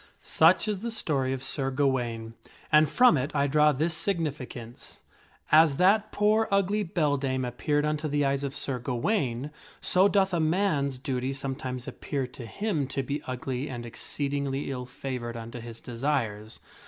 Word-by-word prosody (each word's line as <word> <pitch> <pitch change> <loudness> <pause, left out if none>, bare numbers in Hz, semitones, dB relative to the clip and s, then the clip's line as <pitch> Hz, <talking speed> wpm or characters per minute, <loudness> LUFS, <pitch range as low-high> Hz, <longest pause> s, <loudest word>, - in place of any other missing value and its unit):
LSuch 165 +6 +4
is 210 -3 -1
the 235 +4 -4
story 140 - -1
of 135 0 -3
Sir 135 0 -1
Gawaine, 125 -5 -1 0.4
and 150 0 +6
from 245 -2 +5
it 130 +2 -1
I 140 -1 +3
draw 150 +2 +4
this 155 +4 0
significance: 150 - -4 0.5
as 155 -2 +6
that 205 +4 +4
poor 215 +2 +3
ugly 200 +1 +2
beldame 140 -7 0
appeared 145 +5 0
unto 155 +1 -1
the 145 -1 +1
eyes 140 0 0
of 140 0 -3
Sir 130 -3 -2
Gawaine, 125 - -1 0.3
so 185 +2 +4
doth 195 -2 +2
a 170 - +2
man's 155 -5 +1
duty 130 0 -2
sometimes 130 -2 -4
appear 140 -2 -3
to 125 -1 -9
him 180 - -2
to 135 0 -2
be 140 +3 -3
ugly 130 +2 -3
and 120 -2 -6
exceedingly 140 +3 -3
ill 125 -2 -5
favored 125 -2 -5
unto 115 +1 -7
his 115 -1 -9
desires. 115 -4 -2
140 Hz, 160 wpm, -28 LUFS, 125-160 Hz, 0.5 s, and